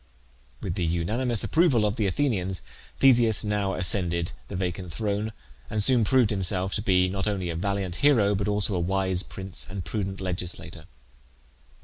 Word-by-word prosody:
With - - -3
the 90 - -3
unanimous 105 +9 -1
approval 155 -10 +2
of 105 0 -1
the 105 -4 0
Athenians, 95 -4 -1 0.3
Theseus 120 -5 +4
now 105 -2 -1
ascended 85 -2 +2 0.2
the 100 - -7
vacant 90 -1 -4
throne, 105 +3 -2 0.4
and 105 -1 0
soon 125 0 +4
proved 125 -1 +3
himself 95 -1 -1
to - - -1
be 90 -3 +2
not 95 +2 -3
only 95 -4 -2
a - - -5
valiant 95 0 -2
hero 115 -9 +3
but 100 +1 -2
also 105 0 +6
a 90 - 0
wise 95 +1 -1
prince 95 -2 -4
and 95 -2 -6
prudent 95 -3 -4
legislator. 90 -2 -5
95 Hz, 160 wpm, -26 LUFS, 90-105 Hz, 0.4 s, also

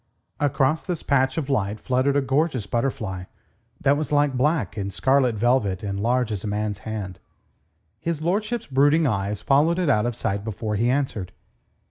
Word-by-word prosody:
Across 145 +1 +1
this 175 -3 -3
patch 130 0 +2
of 150 -5 -1
light 105 -6 -1
fluttered 130 +2 +1
a 145 - +2
gorgeous 135 -3 0
butterfly, 105 -5 -2 0.5
that 140 +1 +3
was 150 0 -3
like 145 -2 +2
black 130 - +1
and 100 -2 -3
scarlet 130 +2 +2
velvet 105 -4 +1
and 100 -1 -3
large 120 +2 +1
as 100 -3 -3
a - - -3
man's 105 -1 -2
hand. 100 -4 -5 0.8
His 165 -2 -2
lordship's 210 +8 -1
brooding 145 +4 +3
eyes 100 -4 -1
followed 150 +5 +3
it 180 -5 +1
out 105 -1 +2
of 120 - -3
sight 100 -3 -2
before 110 0 -4
he 115 +4 +1
answered. 130 -8 -1
130 Hz, 170 wpm, -24 LUFS, 105-145 Hz, 0.8 s, that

